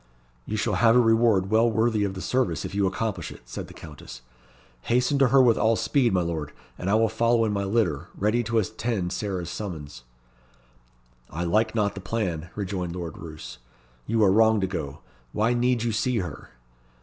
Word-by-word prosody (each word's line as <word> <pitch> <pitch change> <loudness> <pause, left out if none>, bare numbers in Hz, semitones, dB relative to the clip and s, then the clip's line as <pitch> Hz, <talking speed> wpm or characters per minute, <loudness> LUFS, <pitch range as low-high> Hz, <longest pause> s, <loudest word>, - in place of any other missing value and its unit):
"You 110 - -2
shall 105 - 0
have 115 0 +6
a - - +7
reward 115 -4 +3
well 115 +2 +4
worthy 110 -1 +1
of 100 -1 -2
the 95 - -6
service 130 -5 0
if 95 - -6
you 100 -1 +1
accomplish 105 +3 -3
it," - - -12
said - - -7
the - - -13
Countess. 70 -5 -11 0.6
"Hasten 125 +4 +2
to 135 - +5
her 135 +2 +4
with 120 -3 +4
all 115 +1 +3
speed, 125 +1 +1
my 90 -2 +1
Lord, 80 -4 -4 0.2
and 95 - -4
I 105 - +3
will 110 +1 +4
follow 115 +1 +2
in 110 - 0
my 100 -1 -1
litter, 95 -9 0
ready 105 +4 +1
to 115 +1 0
attend 110 -3 -1
Sarah's 90 -5 -3
summons." 80 - -7 1.3
"I 85 +3 -4
like 110 +7 +1
not 105 -2 +1
the 100 - -8
plan," 90 -5 -3
rejoined 90 -4 -3
Lord 85 -3 -5
Roos. 80 -5 -9 0.5
"You 115 0 +2
are 95 - +5
wrong 110 +1 +4
to - - +2
go. 80 -7 -5 0.3
Why 110 +3 +2
need 120 -1 +1
you 120 - 0
see 120 +3 0
her?" 90 -8 -5
105 Hz, 195 wpm, -25 LUFS, 90-115 Hz, 1.3 s, a